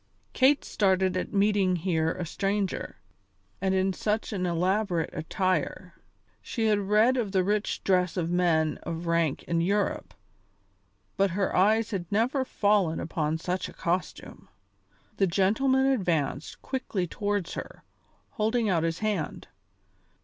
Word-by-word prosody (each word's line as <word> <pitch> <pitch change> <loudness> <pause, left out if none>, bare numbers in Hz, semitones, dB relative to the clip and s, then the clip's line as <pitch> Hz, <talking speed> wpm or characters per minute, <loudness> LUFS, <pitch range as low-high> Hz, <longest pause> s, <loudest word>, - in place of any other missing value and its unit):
Kate 275 +3 +3
started 190 -2 +1
at 185 - -2
meeting 200 -2 +2
here 165 -2 0
a 180 0 -4
stranger, 195 +3 -2 0.7
and 190 -1 +1
in 190 0 +1
such 215 +3 -2
an 185 -2 -1
elaborate 180 0 0
attire. 185 +3 -2 0.5
She 225 -2 -2
had 210 -2 +3
read 210 +6 +3
of 220 -5 -1
the 190 -1 +3
rich 210 +2 -1
dress 180 -1 +1
of 170 -1 -1
men 165 -3 +2
of 170 0 -5
rank 170 -4 0
in 170 -1 0
Europe, 200 +3 -1 1.0
but 195 0 +3
her 195 - 0
eyes 220 +4 +3
had 180 -5 -4
never 245 +6 +1
fallen 200 -9 +1
upon 160 -1 -2
such 180 +3 -3
a - - -12
costume. 175 +2 -4 0.7
The 195 - +3
gentleman 240 +10 +2
advanced 170 - -1
quickly 240 -8 -2
towards 205 0 -2
her, - - -8 0.5
holding 220 0 0
out 170 -4 +2
his 165 0 -1
hand. 205 -7 -3
190 Hz, 135 wpm, -27 LUFS, 170-210 Hz, 1.0 s, Kate